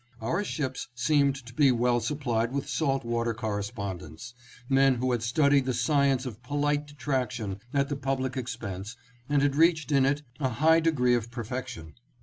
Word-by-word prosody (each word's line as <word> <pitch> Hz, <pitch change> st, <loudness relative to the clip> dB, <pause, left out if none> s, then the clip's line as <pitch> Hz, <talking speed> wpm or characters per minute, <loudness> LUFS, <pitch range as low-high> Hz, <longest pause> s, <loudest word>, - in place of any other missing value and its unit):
Our 165 Hz, -, -1 dB
ships 135 Hz, -9 st, -3 dB
seemed 140 Hz, +2 st, +2 dB
to 120 Hz, -, -11 dB
be 140 Hz, +1 st, +4 dB
well 120 Hz, 0 st, +2 dB
supplied 120 Hz, -2 st, -1 dB
with 140 Hz, 0 st, -3 dB
salt 135 Hz, -5 st, 0 dB
water 115 Hz, -1 st, -1 dB
correspondents; 100 Hz, -4 st, -5 dB, 0.3 s
men 135 Hz, 0 st, +4 dB
who 125 Hz, +1 st, -1 dB
had 120 Hz, -2 st, 0 dB
studied 140 Hz, +3 st, +3 dB
the 130 Hz, -, 0 dB
science 140 Hz, -3 st, +2 dB
of 120 Hz, -2 st, -7 dB
polite 145 Hz, +2 st, -1 dB
detraction 125 Hz, -8 st, -3 dB
at 140 Hz, -1 st, +1 dB
the 145 Hz, -, -2 dB
public 135 Hz, -2 st, -2 dB
expense 115 Hz, -4 st, -5 dB, 0.3 s
and 145 Hz, -1 st, +3 dB
had 140 Hz, -1 st, +2 dB
reached 160 Hz, 0 st, +3 dB
in 135 Hz, -2 st, +4 dB
it 145 Hz, +1 st, 0 dB, 0.2 s
a 135 Hz, -3 st, +1 dB
high 160 Hz, +7 st, +4 dB
degree 145 Hz, -7 st, +2 dB
of 115 Hz, -1 st, 0 dB
perfec 125 Hz, +2 st, -5 dB
tion. 80 Hz, -11 st, -9 dB
130 Hz, 170 wpm, -28 LUFS, 115-145 Hz, 0.3 s, be